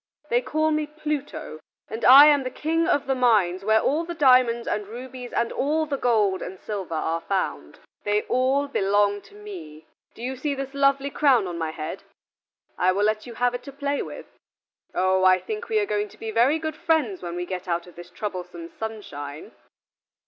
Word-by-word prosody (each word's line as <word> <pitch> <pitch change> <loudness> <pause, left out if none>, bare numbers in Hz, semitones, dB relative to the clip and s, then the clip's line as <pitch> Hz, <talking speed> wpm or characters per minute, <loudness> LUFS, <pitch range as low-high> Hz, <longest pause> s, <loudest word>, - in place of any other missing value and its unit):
They 240 +1 +3
call 310 +5 0
me 305 -1 0
Pluto, 300 - -5 0.3
and 220 +1 -6
I 275 +3 +10
am 295 -2 +5
the 255 - -3
King 325 +5 -1
of 290 -5 +1
the 270 - +1
mines 210 -8 +2
where 220 +2 +4
all 310 +4 +1
the 340 0 -6
diamonds 250 -5 +4
and 210 -1 -2
rubies 250 +2 -8
and 235 - 0
all 310 +3 0
the 290 -2 -2
gold 215 -8 +1
and 190 - -7
silver 195 -6 -5
are 165 +1 -1
found: 195 +1 -3 0.2
they 210 0 +1
all 265 +3 +1
belong 205 -4 +1
to 200 +1 -19
me. 165 -7 -10 0.3
Do 230 - -10
you 260 +2 -3
see 280 +2 -2
this 270 0 -5
lovely 275 0 +2
crown 265 -9 +3
on 175 -2 -5
my 160 -1 -1
head? 155 0 -6 0.8
I 185 +1 +4
will 200 +2 0
let 215 +2 0
you 235 - -9
have 245 +1 +1
it 245 - -4
to 275 - -10
play 280 +1 -2
with. - - -8 0.7
Oh, 185 +1 +2
I 185 0 +6
think 435 - -6
we 440 - +1
are 420 - +2
going 210 - -1
to - - -18
be 225 - -5
very 245 +8 +3
good 315 -1 -4
friends 315 - 0
when 175 -1 -5
we 175 0 -3
get 185 0 -6
out 170 -1 -1
of 180 - -15
this 175 0 -11
troublesome 180 -4 -6
sunshine." 155 -10 -7
230 Hz, 200 wpm, -24 LUFS, 190-280 Hz, 0.8 s, I